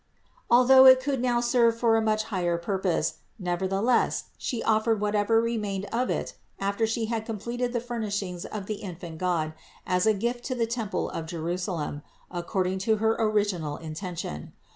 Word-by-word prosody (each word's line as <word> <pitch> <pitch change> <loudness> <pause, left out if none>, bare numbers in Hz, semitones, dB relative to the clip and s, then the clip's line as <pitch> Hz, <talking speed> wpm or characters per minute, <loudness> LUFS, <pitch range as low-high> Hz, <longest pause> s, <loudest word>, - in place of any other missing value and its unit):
Although 260 +2 +8
it 260 0 +9
could 265 -1 -1
now 240 -1 +2
serve 235 -1 +3
for 230 -2 +3
another 225 0 +2
much 215 0 +2
higher 175 -5 -1
purpose, 175 -3 -1 0.2
nevertheless, 190 +5 0
She 235 -3 -3
offered 220 0 +2
whatever 210 +2 +2
re 230 0 0
mained 200 -2 -3
of 250 +2 0
it - - -2 0.2
after 200 +3 0
She 225 0 -1
had 225 0 -2
completed 235 +3 -3
the 240 - 0
furnishings 205 -7 -3
of 205 -2 -6
the 215 +1 -3
infant 170 -4 -8
God 170 -4 0 0.3
as 180 +3 +1
a 215 - +4
gift 240 +4 -2
to 255 - -2
the 235 -2 +1
temple 225 -3 -2
of 160 -1 -5
Jerusalem, 170 -2 -3 0.3
ac 175 - -2
cording 190 0 0
to 220 +3 +2
her 220 +1 +1
original 205 -8 0
intention. 160 - -6
210 Hz, 170 wpm, -27 LUFS, 180-230 Hz, 0.3 s, it